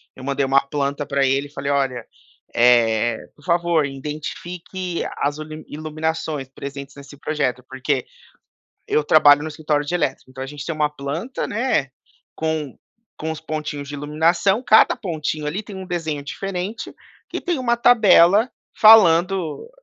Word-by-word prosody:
eu 130 - -11
mandei 140 0 0
uma 135 +1 +4
planta 140 0 -3
pra 140 -1 +1
ele 135 +2 +1
e - - -22
falei: 140 -1 -3
"Olha, 135 -4 -1 0.5
eh, 120 -1 +3 0.2
por 145 - -22
favor, 170 -2 +2
identifique 170 +6 -5
as 145 +2 -1
ulimi 155 0 -8
iluminações 155 -2 -3
presentes 140 0 -8
nesse 140 0 -12
projeto". 140 -4 -2
Porque 135 0 -2 0.8
eu 150 - +1
trabalho 145 -1 +6
no 155 - -4
escritório 150 -1 -1
de 160 - -4
elétrica, 135 -6 -2
então 130 0 -6
a 135 - -6
gente 145 0 -8
tem 165 - -2
uma 150 -1 +1
planta, 150 - -4
né, 225 - 0 0.5
com 160 -4 -3 0.4
com 160 - -4
os 160 -1 -4
pontinhos 150 -3 -5
de 145 - -8
iluminação, 165 - +1
cada 220 - +6
pontinho 155 -8 -4
ali 175 +8 -2
tem 205 -1 -10
um 190 0 -7
desenho 160 -5 -3
diferente, 195 +6 -5 0.4
e - - -3
tem 345 -6 -2
uma 240 -1 +1
tabela 215 -2 +5 0.3
falando 190 - +5
150 Hz, 155 wpm, -21 LUFS, 140-175 Hz, 0.8 s, trabalho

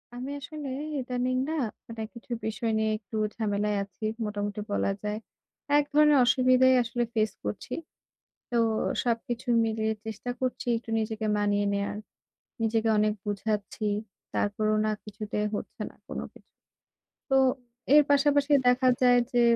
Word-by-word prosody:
আমি 255 +3 -5
আসলে 295 0 -7 0.3
ইদানিং 255 0 -1
না - - -1 0.3
মানে 230 -1 -7
কিছু 235 0 -13
বিষয় 220 +1 -1
নিয়ে 220 0 +1
একটু 215 +1 -11 0.2
ঝামেলায় 210 -1 0
আছি 200 +2 -8 0.2
মোটামুটি 205 0 -3
বলা 200 - +1
যায়। 210 0 -2 0.6
এক 295 - +3
ধরনের 300 -1 +6
অসুবিধাই 255 +1 +5
আসলে 240 +1 -1
ফেইস 215 -2 +2
করছি। 105 0 -4 0.8
তো 240 - +1 0.5
সবকিছু 240 +1 -2 0.2
মিলিয়ে 220 0 0
চেষ্টা 220 +2 -5
করছি 255 -1 -2
একটু 230 - -10
নিজেকে 220 0 -2
মানিয়ে 205 0 +1
নেয়ার। 200 +1 -2 0.7
নিজেকে 225 0 +1
অনেক 210 0 +3
বুঝাচ্ছি, 210 +1 -2 0.5
তারপরেও 215 +1 +1
না - - +2
কিছুতেই 210 0 -3
হচ্ছে - - -6
না - - -19
কোনো - - -4
কিছু। - - -20 0.8
তো 270 - +3 0.6
এর 300 - +8
পাশাপাশি 285 0 +3 0.2
দেখা 255 +1 +5
যায় 245 -1 +6
যে 245 - +3
225 Hz, 140 wpm, -28 LUFS, 210-255 Hz, 0.8 s, এর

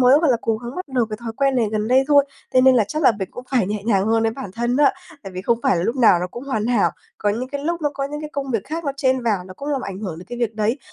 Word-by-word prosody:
mới, 255 +3 +6
gọi 320 -4 +3
là, 240 - +4
cố 225 -1 0
gắng 240 +2 -8
bắt 365 -4 -5
được 240 -3 +2
cái 215 - -3
thói 230 -1 -5
quen 275 -1 +2
này 235 -3 +2
gần 215 0 -1
đây 260 +2 +4
thôi. 285 -1 +6 0.3
Thế 255 - +7
nên 260 0 +6
là 225 - +4
chắc 310 +1 -2
là 260 - +6
mình 190 - -3
cũng 245 - -9
phải 250 -8 +2
nhẹ 205 +1 -3
nhàng 200 -3 +2
hơn 225 0 +2
với 225 - +2
bản 230 -3 -7
thân 240 +2 0
á, 285 -1 +5 0.3
tại 195 -2 -8
vì 185 0 -5
không 230 +3 +1
phải - - +3
là 170 - 0
lúc 230 +8 -1
nào 225 -8 +5
nó 180 - -1
cũng 240 +8 -8
hoàn 220 -6 -1
hảo. 235 -4 +3 0.3
Có 210 - 0
những 240 +5 -3
cái 285 0 -5
lúc 340 +2 -1
nó 295 -2 0
có 275 - -2
những 295 - -5
cái 305 -1 -6
công 275 -1 -3
việc 225 -5 -1
khác 325 +4 -5
nó 280 - -1
chen 260 -2 +1
vào 210 -6 0
nó 185 - -10
cũng 280 +9 -7
làm 280 -2 0
ảnh 195 -4 -6
hưởng 185 -7 -5
đến 180 - -11
cái 240 0 -7
việc 230 -2 -1
đấy. 220 +4 0
240 Hz, 345 wpm, -21 LUFS, 215-275 Hz, 0.3 s, Thế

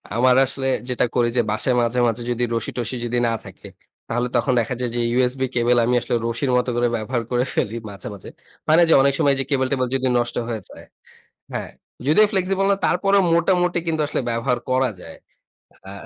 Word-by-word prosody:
আমার 125 +1 +4
আসলে 135 0 -4 0.2
যেটা 125 - +1
করি 120 -1 +2
যে, - - +5
বাসায় 125 +4 0
মাঝে, 120 +1 0
মাঝে 115 +1 -2
যদি 120 0 -1
রশি-টোশি 115 +2 -2
যদি 120 +1 -1
না 115 - 0
থাকে - - -12 0.4
তাহলে 120 +2 -1
তখন 130 - +2
দেখা 115 +2 -1
যায় 125 - -1
যে, - - -1 0.2
USB 130 +1 +1
কেবল 120 0 +3
আমি 125 +1 +1
আসলে - - -2
রশির 125 +3 -1
মতো 125 - 0
করে 120 0 +2
ব্যবহার 115 +2 -2
করে 125 0 +2
ফেলি 110 - -1
মাঝে, 100 -2 -7
মাঝে। 100 - -11 0.4
হয় 155 +1 +5
না - - +7
যে - - +6
অনেক 140 0 +3
সময় 140 -1 +3
যে, 135 - +1
ক্যাবল-টেবল 130 -1 0
যদি 130 0 0
নষ্ট 120 0 -1
হয়ে 115 -3 -4
যায়। - - -13 0.7
হ্যাঁ, - - -4 0.4
যদিও 210 +9 +5
ফ্লেক্সিবল 195 +1 +1
না 200 - +3
তারপরেও 195 +2 +2
মোটামুটি 175 +1 +2
কিন্তু 160 -1 -1
আসলে - - -2
ব্যবহার 120 +2 0
করা 130 -1 +2
যায়। 80 - -11 0.7
আ - - -8
125 Hz, 200 wpm, -21 LUFS, 120-140 Hz, 0.7 s, না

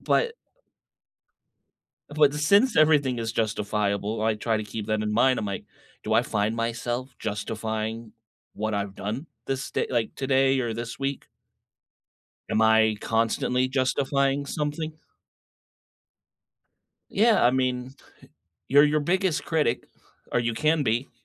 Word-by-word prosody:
But 470 -1 +1 1.8
but 145 -2 +4
the 150 - -4
since 200 - +4
everything 145 -5 +4
is 115 -1 -3
justifiable, 105 -1 -1
I 110 0 +2
try 110 +1 -1
to 110 - -3
keep 105 0 -6
that 110 0 0
in 105 0 -2
mind, 130 +3 +3
I'm 110 - -3
like, 100 -1 -4 0.4
"Do 110 - -1
I 115 - +5
find 110 -1 -1
myself 120 +2 -3
justifying 110 +1 -4 0.4
what 110 0 -2
I've 100 -1 -3
done 110 +12 -5 0.2
this 135 0 -3
day - - -1
like, 120 -3 -1
today 135 0 +2
or 120 -2 -2
this 115 +2 -6
week?" 135 0 -3 1.2
Am 110 - +2
I 110 -1 +4
constantly 115 +3 0
justifying 135 +1 0
something? 150 +2 -3 2.2
Yeah, 220 - +4
I 120 - +6
mean, 130 0 -1 0.7
you're 145 +3 +7
your 150 +1 +2
biggest 180 +2 0
critic, 150 -7 0 0.5
or 120 - +2
you 115 -1 -1
can 155 +3 +2
be. 120 +2 -1
120 Hz, 135 wpm, -26 LUFS, 110-140 Hz, 2.2 s, you're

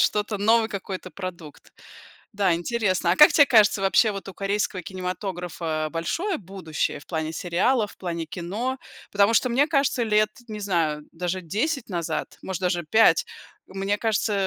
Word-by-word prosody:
что-то, 210 0 +1
новый 220 +2 +3
какой-то 190 -2 -6
продукт. 175 -6 -9 0.6
Да, 195 -4 +2
интересно. 185 -1 0
А - - -1
как 300 - +9
те 285 - +7
кажется, 210 -4 +4
вообще 210 +3 +4
вот 195 - -7
у 195 - -7
корейского 200 -1 -1
кинематографа 180 -4 -4
большое 330 - -2
будущее 180 -6 -3
в - - -17
плане 160 -2 -3
сериалов, 205 +7 0
в - - -21
плане 170 -3 -4
кино? 205 +11 -4 0.3
Потому 205 +3 +4
что, 255 - +3
мне 265 +5 +3
кажется 275 -5 +1
лет, 215 -1 +2 0.2
не 215 -1 -6
знаю, 160 -6 -1
даже 180 +2 -3
10 235 - -2
назад, 170 -3 -3
может 190 -1 -5
даже 175 -2 0
5, 220 +8 +4 0.4
мне 195 +2 -2
кажется, 220 -1 0
195 Hz, 160 wpm, -24 LUFS, 175-220 Hz, 0.6 s, как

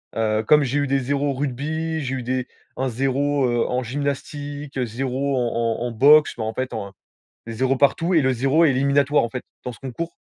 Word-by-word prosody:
heu, 110 -1 +1
comme 150 -1 +6
j'ai 140 +3 0
eu 145 - 0
des 135 +1 +2
0 140 +2 -1
en - - 0
rugby, 155 +4 -2
j'ai 135 -1 -3
eu 125 - -4
des 130 0 -2 0.3
un 130 +1 -1
0, 135 +3 0
heu, 120 -1 +1
en 125 0 -1
gymnastique, 145 +1 -4
0 130 +3 -2
en 115 -1 -1
en - - -2
en 120 - -3
boxe. 145 +6 +5
Mais, 110 - -1
en 110 0 -3
fait, 130 0 -3
en 100 0 -5 0.6
des 115 - -5
0 130 +3 +1
partout 165 +6 +2
et 160 - +4
le 130 0 +2
0 135 +7 +3
est 155 - +5
éliminatoire, 140 +1 +2
en - - -2
fait. 125 0 -5 0.2
Dans 125 - -4
ce - - -14
concours, 135 +6 -6
135 Hz, 220 wpm, -22 LUFS, 125-145 Hz, 0.6 s, comme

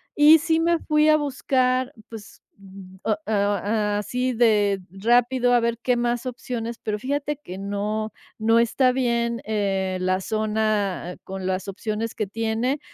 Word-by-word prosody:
y 300 +2 +7
sí 325 0 +1
me 335 0 +2
fui 305 0 +2
a 305 - +6
buscar, 260 -2 0 0.2
pues, 220 -2 -11 0.6
ah, 215 -2 +1
ah, 205 0 0
así 250 +4 -2
de 210 -4 +3
rápido 245 +4 +2
a 240 - +5
ver 235 0 -1
qué 250 -1 +2
más 240 +1 -1
opciones, 240 -2 -5
pero 210 -1 -2
fíjate 285 +3 -2
que 185 +1 -8
no 210 +2 -3 0.3
no 225 +1 +3
está 250 +2 +3
bien, 235 -2 0
eh, 195 -3 -1
la 185 +1 +1
zona, 215 -4 -1
con 190 -1 -6
las 190 +1 -2
opciones 215 +3 -4
que 215 - -1
tiene, 225 +6 -1
225 Hz, 150 wpm, -23 LUFS, 205-255 Hz, 0.6 s, y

